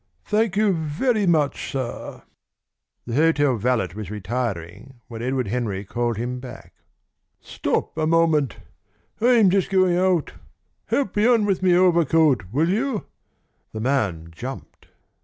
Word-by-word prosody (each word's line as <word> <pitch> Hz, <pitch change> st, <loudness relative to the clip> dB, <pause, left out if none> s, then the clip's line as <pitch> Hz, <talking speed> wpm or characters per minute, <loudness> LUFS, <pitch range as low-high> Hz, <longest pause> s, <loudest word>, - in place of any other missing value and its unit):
Thank 210 Hz, -2 st, +1 dB
you 210 Hz, -2 st, +3 dB
very 185 Hz, -, 0 dB
much, 155 Hz, -5 st, +1 dB
sir." 130 Hz, -3 st, -5 dB, 0.8 s
The 120 Hz, -, -5 dB
hotel 145 Hz, -2 st, +3 dB
valet 115 Hz, -3 st, 0 dB
was 105 Hz, -4 st, -6 dB
retiring 105 Hz, +2 st, -5 dB
when 115 Hz, -1 st, -8 dB
Edward 130 Hz, -2 st, -1 dB
Henry 105 Hz, -4 st, -2 dB
called 120 Hz, +2 st, -2 dB
him 125 Hz, +2 st, -3 dB
back. 125 Hz, 0 st, -11 dB, 0.7 s
"Stop -, -, -3 dB
a 155 Hz, 0 st, 0 dB
moment. 160 Hz, -6 st, +2 dB, 0.6 s
I'm 230 Hz, -5 st, +5 dB
just 195 Hz, -1 st, +1 dB
going 185 Hz, -2 st, +3 dB
out. 180 Hz, -3 st, +1 dB, 0.5 s
Help 275 Hz, -9 st, -1 dB
me 210 Hz, +2 st, +3 dB
on 235 Hz, -4 st, +4 dB
with 195 Hz, -3 st, 0 dB
my 180 Hz, -2 st, +4 dB
overcoat, 165 Hz, -, +3 dB
will 155 Hz, +7 st, +1 dB
you?" 225 Hz, +3 st, -1 dB, 0.7 s
The 110 Hz, -, -5 dB
man 105 Hz, -10 st, -1 dB
jumped. 125 Hz, +11 st, -9 dB
145 Hz, 135 wpm, -23 LUFS, 120-185 Hz, 0.8 s, I'm